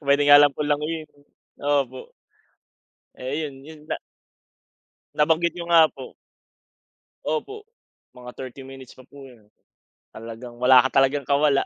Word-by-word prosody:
puwede 140 +1 +2
nga 145 0 +8
lang 145 - +5
po 145 +2 -4
languyin, 155 +2 -2
eh, 145 - -25 0.4
opo. 140 -3 -2 1.1
Eh 130 +2 -5
yun, 140 - -10
yun 155 -1 -12
na. - - -1 1.2
Nabanggit 160 +2 +2
niyo 170 -1 -7
nga 165 -2 +6
po. 130 -2 -11 1.1
Opo. 405 - -4 0.5
Mga 125 0 -10
30 130 +1 -9
minutes 135 -1 -13
pa 130 - -16
po 140 +1 -15
yun. 115 -4 -19 0.7
Talagang 115 +2 -10
wala 130 0 +6
ka 135 +1 +3
talagang 140 +1 0
kawala. 140 0 +2
140 Hz, 140 wpm, -23 LUFS, 130-150 Hz, 1.2 s, nga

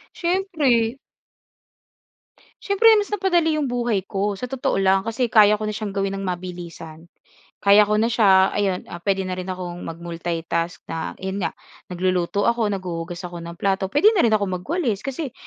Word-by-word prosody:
Siyempre. 310 - +1 1.7
Siyempre, 400 +3 +3
mas 415 0 0
napadali 345 -6 +1
yung 285 - -1
buhay 235 -6 -1
ko 200 0 -2
sa 250 - -4
totoo 270 -3 -1
lang, 195 0 +3
kasi 230 +3 -1
kaya 210 -1 +5
ko 215 - -3
na 215 - -3
siyang 215 -2 -4
gawin 195 0 -2
ng 195 - -5
mabilisan. 175 -3 -7 0.5
Kaya 205 +1 +5
ko 210 - +2
na 225 +2 +1
siya, 190 -4 +5
ayun, 190 -3 -1 0.2
puwede 195 +1 0
na 185 - -4
rin 185 0 -5
akong 180 -1 -5
mag 165 -2 -6
multitask 170 0 -3
na 160 - -5
yun 190 +1 -4
nga 165 -3 -3 0.3
nagluluto 185 +2 0
ako, 235 -2 +2
naghuhugas 180 -2 -5
ako 175 -1 -7
ng 170 0 -8
plato. 195 0 0
Puwede 325 - +4
na 385 - +2
rin - - +4
akong 200 -4 0
magwalis, 260 - -1
kasi 270 +1 -5
195 Hz, 170 wpm, -22 LUFS, 180-240 Hz, 1.7 s, kaya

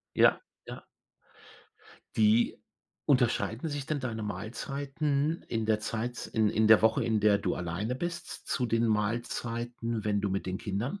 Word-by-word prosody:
Ja, - - +5 0.3
ja. - - -9 1.3
Wie 110 +2 +3 0.4
unterscheiden 125 +1 +2
sich 145 -2 -4
denn 155 -2 -1
deine 115 -4 -4
Mahlzeiten 140 - -2
in 115 -2 -1
der 110 -1 +2
Zeit 115 +3 -3
in 110 -1 +2
in 110 +1 +2
der 110 - +8
Woche, 110 0 +3
in 110 -2 +2
der 105 -1 +4
du - - -1
alleine 90 +8 -3
bist, 175 +3 -5
zu 125 - 0
den 115 0 +2
Mahlzeiten, 115 +1 -2
wenn 105 -1 +1
du 100 - -1
mit 95 0 -2
den 95 +2 -2
Kindern 110 - -3
115 Hz, 155 wpm, -30 LUFS, 105-125 Hz, 1.3 s, der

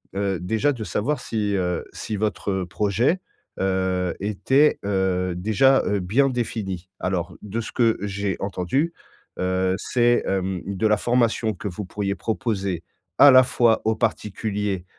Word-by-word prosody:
heu, 100 -3 -1
déjà 110 +10 +1
de 115 -5 -5
savoir 110 - -1
si, 105 -2 -2
heu, 90 -1 -1
si 110 - -5
votre 100 -2 -1
projet, 105 - +1 0.4
heu, 95 -1 0
était, 130 +9 +2
heu, 95 -2 0
déjà, 110 +8 +3
heu, 100 -1 0
bien 120 +10 +2
défini. 95 -7 -3
Alors, 90 -2 -2
de 105 +2 -4
ce 115 - -5
que 115 -2 +2
j'ai 100 -1 -2
entendu, 100 - -1 0.5
heu, 95 0 +1
c'est, 120 -1 +2
hem, 95 -1 -1
de 100 +2 -2
la 105 - +3
formation 115 -2 +1
que 105 - -6
vous 95 +2 -5
pourriez 100 +1 -2
proposer 100 -6 -2 0.3
à 145 - +9
la 130 - +9
fois 120 -3 +2
aux 110 0 +2
particuliers 105 -3 -2
100 Hz, 150 wpm, -23 LUFS, 95-115 Hz, 0.5 s, à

